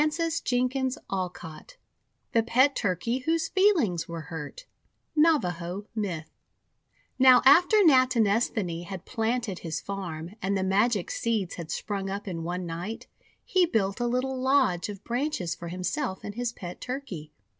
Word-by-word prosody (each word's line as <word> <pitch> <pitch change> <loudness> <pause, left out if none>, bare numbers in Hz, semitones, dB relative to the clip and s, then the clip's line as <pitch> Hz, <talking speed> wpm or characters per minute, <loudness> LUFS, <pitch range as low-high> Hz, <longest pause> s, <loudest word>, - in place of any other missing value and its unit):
366 330 +2 0
THE 255 -1 -1
WONDER 185 -2 -1
GARDEN 160 -3 -10 0.6
THE 230 - +4
PET 255 +5 +3
TURKEY 225 +5 -1
WHOSE 325 +4 0
FEELINGS 335 - +2
WERE 170 -1 -5
HURT 160 - -8 0.5
Navaho 195 - +1
Myth 185 -8 -3 0.9
Now 255 -1 +7
after 350 +10 +7
Natinesthani 225 - +3
had 190 -1 -7
planted 225 -4 -1
his 165 -1 -4
farm, 175 -4 -5
and 195 +1 0
the 190 - 0
magic 200 +1 +1
seeds 220 -6 -1
had 170 -3 -7
sprung 195 0 -3
up 200 +2 -5
in 170 -3 -4
one 180 +2 -3
night, 185 +9 -5 0.4
he 370 -3 +3
built 200 - 0
a 240 - 0
little 255 +2 -1
lodge 260 -10 +2
of 205 -1 -8
branches 240 - -1
for 170 - -8
himself 185 - -3
and 205 - -5
his 240 +1 -2
pet 180 -6 -9
Turkey. 225 - -6
215 Hz, 145 wpm, -27 LUFS, 180-260 Hz, 0.9 s, Now